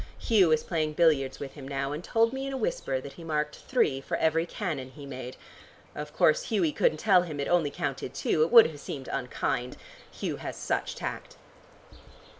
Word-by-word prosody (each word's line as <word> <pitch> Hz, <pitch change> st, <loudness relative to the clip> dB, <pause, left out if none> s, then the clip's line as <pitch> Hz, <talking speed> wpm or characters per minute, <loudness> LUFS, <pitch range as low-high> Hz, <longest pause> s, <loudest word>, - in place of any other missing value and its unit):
Hugh 195 Hz, -8 st, +3 dB
is 155 Hz, -1 st, +3 dB
playing 155 Hz, -3 st, -1 dB
billiards 150 Hz, -5 st, +2 dB
with 140 Hz, -2 st, -6 dB
him 140 Hz, -3 st, -9 dB
now, 140 Hz, 0 st, -2 dB
and 150 Hz, +4 st, -5 dB
told 230 Hz, +4 st, +2 dB
me 270 Hz, +1 st, -3 dB
in 275 Hz, -, -4 dB
a -, -, -2 dB
whisper 135 Hz, -, -1 dB
that 140 Hz, +1 st, -9 dB
he 170 Hz, -, -11 dB
marked 150 Hz, -2 st, -2 dB
three 150 Hz, -, 0 dB
for -, -, -2 dB
every 165 Hz, +1 st, +1 dB
cannon 155 Hz, -12 st, -4 dB
he 140 Hz, +2 st, -11 dB
made. 130 Hz, -2 st, -7 dB, 0.6 s
Of 150 Hz, 0 st, -6 dB
course 155 Hz, -, +3 dB
Hughie 185 Hz, -8 st, +1 dB
couldn't 155 Hz, -, +2 dB
tell 185 Hz, +1 st, +5 dB
him 155 Hz, -5 st, -6 dB
it 140 Hz, -, -1 dB
only 175 Hz, -4 st, +2 dB
counted 140 Hz, -4 st, -4 dB
two. 145 Hz, +2 st, +1 dB
It 160 Hz, -, +4 dB
would 230 Hz, -2 st, +10 dB
have 150 Hz, -2 st, -5 dB
seemed 135 Hz, -2 st, -7 dB
unkind. 125 Hz, 0 st, -2 dB, 0.3 s
Hugh -, -, -4 dB
has -, -, -6 dB
such -, -, -2 dB
tact." -, -, -6 dB
155 Hz, 200 wpm, -28 LUFS, 140-175 Hz, 0.6 s, would